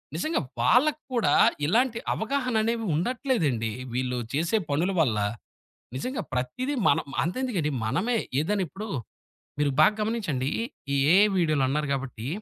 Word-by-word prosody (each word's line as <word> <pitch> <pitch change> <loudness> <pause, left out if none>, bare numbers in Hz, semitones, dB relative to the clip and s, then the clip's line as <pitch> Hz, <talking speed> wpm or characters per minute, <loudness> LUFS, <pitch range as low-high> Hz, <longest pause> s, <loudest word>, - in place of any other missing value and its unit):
నిజంగా 310 - 0 0.2
వాళ్ళక్కూడా 255 - +2 0.3
ఇలాంటి 230 - +2
అవగాహననేవి 230 -2 0
ఉండట్లేదండి 165 - 0 0.2
వీళ్ళు 125 0 -1
చేసే 165 +9 +1
పనుల 165 +7 +1
వల్ల. 120 -9 +2 0.8
నిజంగా 250 - -3
ప్రత్తీది 130 - -2
మన 140 - +4 0.3
అంతెందుకండి 185 - -1
మనమే 185 - 0 0.2
ఏదైనిప్పుడు 195 +4 -2 0.7
మీరు 145 -1 +2
బాగా 155 +7 +6
గమనించండి. 195 - -1 0.4
ఈ - - +2 0.2
ఏఐ 205 +3 +7
వీడియోలన్నారు 150 -3 +1
గాబట్టి 130 -4 -4
180 Hz, 105 wpm, -26 LUFS, 140-235 Hz, 0.8 s, ఏఐ